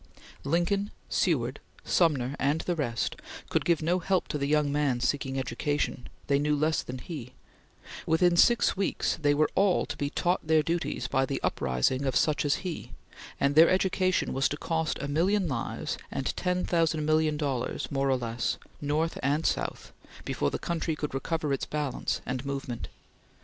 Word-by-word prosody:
Lincoln, 175 +7 +1 0.2
Seward, - - +1 0.2
Sumner, 140 -6 +2
and 145 +4 +1
the 175 - -1
rest, 120 -7 -2 0.3
could - - +1
give 170 -2 +2
no 175 +3 +2
help 185 +1 0
to 150 - -2
the 140 - 0
young 150 -1 +2
man 145 -4 +1
seeking 135 +1 -1
education; 135 0 -2 0.2
they 140 0 +2
knew 150 +1 +2
less 155 +2 +1
than 125 - -6
he; 125 -2 -7 0.7
within 170 +2 +4
six 235 +7 +5
weeks 195 -3 -1
they 145 -1 +3
were 155 +1 +2
all 195 -2 +3
to - - -5
be 145 - -2
taught 175 +1 0
their 160 -1 +4
duties 170 +2 -2
by 135 -1 +1
the 140 - -2
uprising 65 - 0
of 130 -2 0
such 150 -1 +2
as 145 - +3
he, 175 -3 -5 0.5
and 140 0 +2
their 160 +3 +7
education 185 0 +1
was 135 0 +2
to 145 - -3
cost 160 0 -1
a 140 - -3
million 180 +6 +2
lives 130 -6 -3
and 135 - -2
ten 180 0 0
thousand 165 -3 +1
million 155 0 +2
dollars, 135 -5 -2
more 135 -1 +1
or 130 - +3
less, 120 -1 -2 0.2
North 150 +3 0
and 145 +4 +1
South, - - -2 0.3
before 70 - 0
the - - -3
country 165 -2 -2
could 150 -2 -4
recover 150 +2 -1
its 135 - -2
balance 150 -3 -2
and 125 0 -3
movement. 135 -4 -4
150 Hz, 175 wpm, -28 LUFS, 135-165 Hz, 0.7 s, their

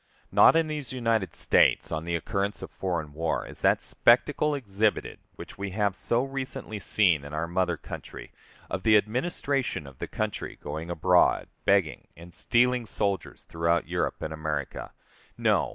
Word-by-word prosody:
Not - - +7
in 165 0 +4
these 150 -3 -5
United 115 -8 0
States - - +3
on 80 +1 -3
the 85 0 -1
occurrence 100 +5 -2
of - - -8
foreign 85 -6 -3
war 80 +2 -1
is - - -12
that - - +3
spectacle 145 +5 +3
exhibited 105 -5 -1 0.2
which - - -11
we 100 0 -3
have 100 -3 +1
so 120 +4 0
recently 135 -5 -5
seen 90 -9 +3
in 70 +1 -7
our 80 +2 -1
mother 90 -1 0
country, - - -9 0.4
of 90 - -3
the 110 +2 +6
administration 125 - -1
of 70 -2 -13
the - - -4
country - - -4
going 80 +3 -5
abroad 90 +1 +3 0.2
begging 100 -5 +2
and 85 +1 -12
stealing 125 +2 +2
soldiers 100 -2 -2
throughout 85 0 0
Europe 85 -1 -2
and 80 - -3
America. 75 -3 -4 0.5
No! - - +2
100 Hz, 160 wpm, -27 LUFS, 85-120 Hz, 0.5 s, Not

